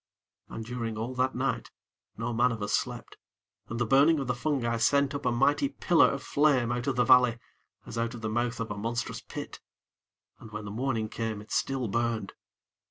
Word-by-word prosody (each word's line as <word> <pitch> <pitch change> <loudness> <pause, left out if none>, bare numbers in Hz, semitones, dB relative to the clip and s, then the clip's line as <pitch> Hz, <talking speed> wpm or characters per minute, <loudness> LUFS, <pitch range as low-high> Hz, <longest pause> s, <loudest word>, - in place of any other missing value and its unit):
And 115 - -6
during 115 -2 -4
all 115 +4 -3
that 130 +1 0
night - - -1 0.5
no 120 - -2
man 120 +2 +3
of 110 -2 -4
us 105 - -2
slept, - - -2 0.5
and 115 - -4
the 120 - +2
burning 140 +7 +5
of 135 - -2
the 125 - 0
fungi 120 -3 -1
sent 140 +5 +3
up 140 -2 -2
a - - +3
mighty 140 +3 +2
pillar 170 -2 +4
of 140 -1 -4
flame 140 -5 +2
out 120 +2 -2
of 135 - +1
the 125 - +3
valley, 125 -1 +6 0.5
as 115 - -5
out 115 +1 -1
of 115 - -9
the 110 - -2
mouth 120 +2 -1
of 115 -1 -3
a 105 - -4
monstrous 115 +3 -3
pit - - -8 0.8
and 110 - -11
when 105 -1 -6
the 100 - -6
morning 115 -1 -1
came 110 -1 -3
it 105 +1 -13
still 135 -3 0
burned. 115 +1 -1
120 Hz, 205 wpm, -29 LUFS, 115-135 Hz, 0.8 s, valley